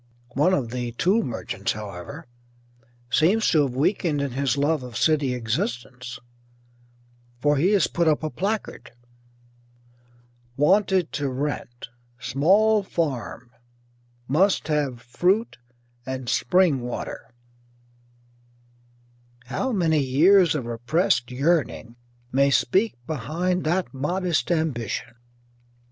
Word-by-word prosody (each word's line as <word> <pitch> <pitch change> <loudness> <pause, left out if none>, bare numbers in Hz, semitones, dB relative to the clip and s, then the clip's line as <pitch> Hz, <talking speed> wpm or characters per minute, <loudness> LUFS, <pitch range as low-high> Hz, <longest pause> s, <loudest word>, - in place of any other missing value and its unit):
One 155 +8 +3
of 120 -5 -3
the 120 -1 -4
tool 190 - +2
merchants, 125 -5 -3
however, 105 - -8 0.9
seems 190 - +3
to 155 - +4
have 135 -3 -1
weakened 155 +1 +1
in 140 -2 -2
his 135 +1 0
love 145 +1 +1
of 125 -2 -7
city 145 -5 +2
existence, 120 +1 -4 1.2
for 145 +2 +2
he 180 +9 +3
has 195 -5 +4
put 170 -1 0
up 155 0 +2
a 155 - -2
placard: 205 -5 -4 1.6
WANTED 185 +3 +3
TO 140 -1 -2
RENT 130 -3 -4 0.3
Small 190 - +3
Farm 130 -9 -3 0.8
Must 180 +9 +2
Have 140 -6 -1
Fruit 180 - 0 0.4
and 130 -1 -5
Spring 160 +3 +2
Water 120 0 -6 2.1
How 255 - -2
many 165 -7 +2
years 160 +6 +4
of 135 -6 -3
repressed 120 +4 0
yearning 135 -3 0 0.4
may 140 +1 +3
speak 190 - +2
behind 160 +7 -2
that 175 +2 0
modest 175 +6 -1
ambition! 125 - -2
145 Hz, 105 wpm, -24 LUFS, 125-175 Hz, 2.1 s, to